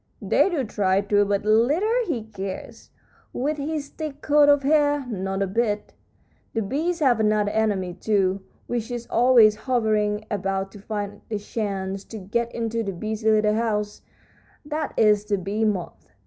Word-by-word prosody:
"They -, -, +2 dB
do 320 Hz, -7 st, -1 dB
try 200 Hz, -3 st, +1 dB
to, 205 Hz, 0 st, +2 dB
but 200 Hz, 0 st, -1 dB
little 325 Hz, -, +2 dB
he 245 Hz, -10 st, -2 dB
cares, 195 Hz, -3 st, -7 dB, 0.4 s
with 295 Hz, +4 st, -1 dB
his 290 Hz, 0 st, -3 dB
thick 300 Hz, -3 st, -7 dB
coat 295 Hz, 0 st, +5 dB
of 285 Hz, -1 st, +4 dB
hair. 290 Hz, -1 st, +2 dB
Not 195 Hz, -4 st, -2 dB
a -, -, +1 dB
bit. 210 Hz, +1 st, -1 dB, 0.6 s
The 225 Hz, -, +1 dB
bees 320 Hz, -, -2 dB
have 250 Hz, -6 st, +4 dB
another 210 Hz, -1 st, +2 dB
enemy, 205 Hz, -5 st, 0 dB
too, 195 Hz, 0 st, 0 dB, 0.2 s
which 240 Hz, -1 st, -3 dB
is 240 Hz, -1 st, -4 dB
always 235 Hz, -3 st, +6 dB
hovering 215 Hz, -3 st, +1 dB
about 195 Hz, -1 st, -2 dB
to 205 Hz, -, -12 dB
find 205 Hz, 0 st, -5 dB
a 215 Hz, -, -1 dB
chance 195 Hz, -2 st, -4 dB
to 225 Hz, -, -8 dB
get 230 Hz, +4 st, -2 dB
into 230 Hz, 0 st, -1 dB
the 200 Hz, -3 st, -3 dB
busy 215 Hz, +4 st, -2 dB
little 215 Hz, -1 st, +3 dB
house; 210 Hz, -2 st, -1 dB, 0.6 s
that 305 Hz, 0 st, -3 dB
is 210 Hz, -1 st, +4 dB
the 205 Hz, -1 st, 0 dB
bee 200 Hz, +4 st, -1 dB
moth. 185 Hz, -6 st, -3 dB
215 Hz, 160 wpm, -24 LUFS, 205-250 Hz, 0.6 s, always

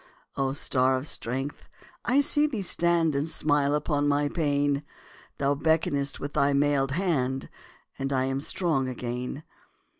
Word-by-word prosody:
O 135 Hz, -1 st, 0 dB
star 130 Hz, -2 st, +1 dB
of 130 Hz, -, -5 dB
strength! 135 Hz, 0 st, -4 dB, 0.3 s
I 265 Hz, +4 st, +3 dB
see 295 Hz, +1 st, +4 dB
thee 230 Hz, -9 st, -3 dB
stand 170 Hz, -3 st, +2 dB
And 140 Hz, +3 st, 0 dB
smile 145 Hz, -2 st, +1 dB
upon 145 Hz, -1 st, 0 dB
my 145 Hz, 0 st, +2 dB
pain; 145 Hz, -3 st, +1 dB, 0.6 s
Thou 140 Hz, 0 st, +2 dB
beckonest 145 Hz, -2 st, 0 dB
with 145 Hz, -, -5 dB
thy 140 Hz, 0 st, +3 dB
mailed 140 Hz, -1 st, +2 dB
hand, 135 Hz, -7 st, -1 dB, 0.5 s
And 135 Hz, 0 st, -2 dB
I 130 Hz, -1 st, +2 dB
am 135 Hz, +1 st, -1 dB
strong 150 Hz, -5 st, 0 dB
again. 125 Hz, +3 st, -4 dB
145 Hz, 145 wpm, -27 LUFS, 135-155 Hz, 0.6 s, see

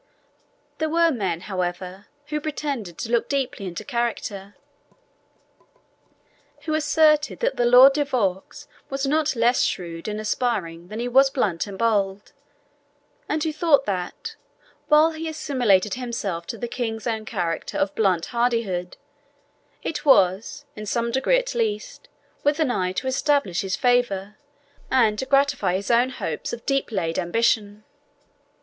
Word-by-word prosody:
There 315 Hz, -1 st, 0 dB
were 335 Hz, +1 st, +3 dB
men, 190 Hz, -, -2 dB
however, 185 Hz, 0 st, -4 dB, 0.2 s
who 300 Hz, 0 st, -3 dB
pretended 280 Hz, -, -4 dB
to 230 Hz, -, -5 dB
look 235 Hz, -1 st, +1 dB
deeply 265 Hz, -8 st, -2 dB
into 175 Hz, -, -6 dB
character, 220 Hz, -5 st, -3 dB, 2.1 s
who 310 Hz, -, -3 dB
asserted 305 Hz, 0 st, +3 dB
that -, -, +1 dB
the 240 Hz, -, +2 dB
Lord 255 Hz, +3 st, +8 dB
de 295 Hz, +1 st, +1 dB
Vaux 250 Hz, +2 st, -2 dB, 0.2 s
was 275 Hz, 0 st, -2 dB
not 305 Hz, +1 st, +1 dB
less 240 Hz, +2 st, +3 dB
shrewd 170 Hz, -1 st, -3 dB
and 210 Hz, 0 st, -3 dB
aspiring 200 Hz, -7 st, -2 dB
than 215 Hz, +4 st, -7 dB
he 240 Hz, -, -2 dB
was 270 Hz, +2 st, +5 dB
blunt 210 Hz, -10 st, -1 dB
and 195 Hz, -1 st, -8 dB
bold, 205 Hz, -3 st, 0 dB, 1.0 s
and 305 Hz, 0 st, 0 dB
who 315 Hz, -2 st, -1 dB
thought 300 Hz, -3 st, +3 dB
that, 180 Hz, -3 st, -4 dB, 0.5 s
while 305 Hz, +2 st, +5 dB
he 320 Hz, 0 st, -5 dB
assimilated 245 Hz, -10 st, +1 dB
himself 220 Hz, -9 st, -4 dB
to 230 Hz, -, -5 dB
the 240 Hz, -, -4 dB
king's 225 Hz, -2 st, -4 dB
own 220 Hz, -2 st, -2 dB
character 175 Hz, -7 st, -3 dB
of 195 Hz, -, 0 dB
blunt 185 Hz, -6 st, +1 dB
hardihood, 230 Hz, -7 st, -1 dB, 0.9 s
it 320 Hz, -, -3 dB
was, 225 Hz, +3 st, +3 dB
in 215 Hz, 0 st, -7 dB
some 235 Hz, +2 st, -1 dB
degree 265 Hz, -, +2 dB
at -, -, -2 dB
least, 215 Hz, -3 st, -3 dB, 0.3 s
with 290 Hz, +2 st, +2 dB
an 305 Hz, -6 st, +2 dB
eye 185 Hz, -6 st, 0 dB
to 225 Hz, -, -3 dB
establish 265 Hz, -, +1 dB
his 190 Hz, -1 st, -2 dB
favour, 240 Hz, -6 st, +1 dB, 0.5 s
and 220 Hz, -5 st, +3 dB
to 265 Hz, -, -3 dB
gratify 275 Hz, -9 st, +2 dB
his 200 Hz, +5 st, -2 dB
own 240 Hz, +2 st, +4 dB
hopes 165 Hz, -11 st, -4 dB
of 235 Hz, -, -7 dB
deep 275 Hz, -3 st, 0 dB
laid 165 Hz, -5 st, -1 dB
ambition. 210 Hz, +2 st, 0 dB
235 Hz, 145 wpm, -23 LUFS, 195-275 Hz, 2.1 s, Lord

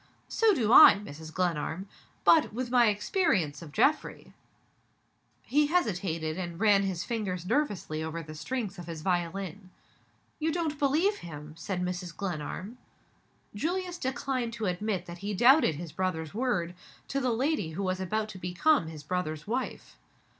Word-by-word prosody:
"So 445 Hz, -3 st, +3 dB
do 230 Hz, -5 st, +2 dB
I, -, -, +10 dB
Mrs. 160 Hz, -6 st, -9 dB
Glenarm. 175 Hz, +1 st, -2 dB, 0.4 s
But, 320 Hz, -2 st, +5 dB
with 245 Hz, +1 st, -3 dB
my 245 Hz, -2 st, +5 dB
experience 205 Hz, -, +1 dB
of 160 Hz, -3 st, -10 dB
Geoffrey 290 Hz, -, 0 dB, 0.6 s
" -, -, -42 dB
He 295 Hz, +1 st, +5 dB
hesitated, 180 Hz, -, -1 dB
and 170 Hz, -2 st, -5 dB
ran 205 Hz, -2 st, +5 dB
his 190 Hz, -3 st, -2 dB
fingers 195 Hz, -7 st, -3 dB
nervously 205 Hz, -, -1 dB
over 165 Hz, +1 st, -4 dB
the 155 Hz, 0 st, -9 dB
strings 200 Hz, +3 st, -4 dB
of 175 Hz, -, -8 dB
his 160 Hz, -2 st, -6 dB
violin. 185 Hz, +1 st, -2 dB, 0.7 s
"You 320 Hz, +1 st, 0 dB
don't 315 Hz, -3 st, -2 dB
believe 315 Hz, +9 st, +2 dB
him?" 150 Hz, -2 st, -9 dB
said 180 Hz, +2 st, -3 dB
Mrs. 180 Hz, -1 st, -4 dB
Glenarm. 185 Hz, +5 st, -5 dB, 0.7 s
Julius 350 Hz, -, -2 dB
declined 255 Hz, -3 st, -2 dB
to 225 Hz, -2 st, -3 dB
admit 185 Hz, 0 st, -1 dB
that 175 Hz, 0 st, -9 dB
he 205 Hz, +2 st, -3 dB
doubted 245 Hz, -, +5 dB
his 165 Hz, +1 st, -7 dB
brother's 160 Hz, -3 st, -2 dB
word, 210 Hz, -8 st, -1 dB, 0.4 s
to 275 Hz, -, 0 dB
the 255 Hz, -2 st, 0 dB
lady 240 Hz, -, 0 dB
who 195 Hz, +5 st, -3 dB
was 185 Hz, 0 st, -1 dB
about 215 Hz, +3 st, -1 dB
to 190 Hz, -, -9 dB
become 180 Hz, -, +2 dB
his 155 Hz, -2 st, -8 dB
brother's 155 Hz, -2 st, -3 dB
wife. 245 Hz, +5 st, -4 dB
195 Hz, 155 wpm, -29 LUFS, 170-255 Hz, 0.7 s, I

